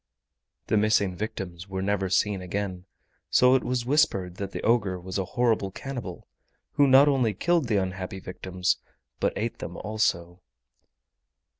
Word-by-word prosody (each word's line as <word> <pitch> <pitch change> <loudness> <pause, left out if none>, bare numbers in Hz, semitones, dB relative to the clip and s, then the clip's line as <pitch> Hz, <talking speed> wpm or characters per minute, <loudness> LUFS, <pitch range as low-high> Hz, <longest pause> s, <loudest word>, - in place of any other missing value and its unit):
The 110 - +1
missing 105 -3 +2
victims 95 -3 -5
were 95 0 -3
never 100 -1 0
seen 95 +1 +1
again, 90 0 -4 0.4
so 125 0 +5
it 130 - +3
was 125 -1 -1
whispered 100 - +1
that 100 -1 -4
the - - -6
ogre 105 -6 +2
was 95 +2 -4
a 95 - -1
horrible 115 -5 +2
cannibal, 120 -3 -7 0.4
who 145 - +4
not 135 +2 +7
only 125 -7 +2
killed 170 - +1
the 110 -3 +2
unhappy 95 0 -3
victims 90 0 -2 0.4
but - - +1
ate - - -3
them - - -6
also. 90 -5 -1
100 Hz, 150 wpm, -26 LUFS, 95-120 Hz, 0.4 s, not